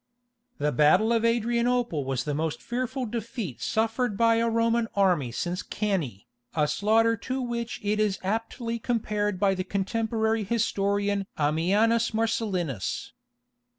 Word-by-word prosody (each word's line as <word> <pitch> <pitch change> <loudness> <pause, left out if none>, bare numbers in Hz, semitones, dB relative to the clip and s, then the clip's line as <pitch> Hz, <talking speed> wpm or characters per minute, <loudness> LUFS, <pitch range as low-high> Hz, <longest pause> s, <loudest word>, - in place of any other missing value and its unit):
The 150 +1 0
battle 180 - +4
of 230 -1 +2
Adrianople 235 - +1
was 130 -2 -1
the 145 - -2
most 155 +1 -2
fearful 255 +2 -3
defeat 230 - -5
suffered 225 0 0
by 230 0 +4
a 230 0 +2
Roman 230 0 +2
army 180 -11 +2
since 175 +9 -2
Cannæ, 170 - -2 0.3
a 150 -2 +2
slaughter 225 +6 +3
to 260 +5 -3
which 235 -2 -3
it 210 +1 0
is 210 -3 +1
aptly 230 +3 -2
compared 210 -4 -1
by 195 0 +3
the 185 -1 -2
contemporary 220 +3 0
historian 200 -2 0
Ammianus 205 +10 +2
Marcellinus. 190 - -1
215 Hz, 130 wpm, -27 LUFS, 185-230 Hz, 0.3 s, battle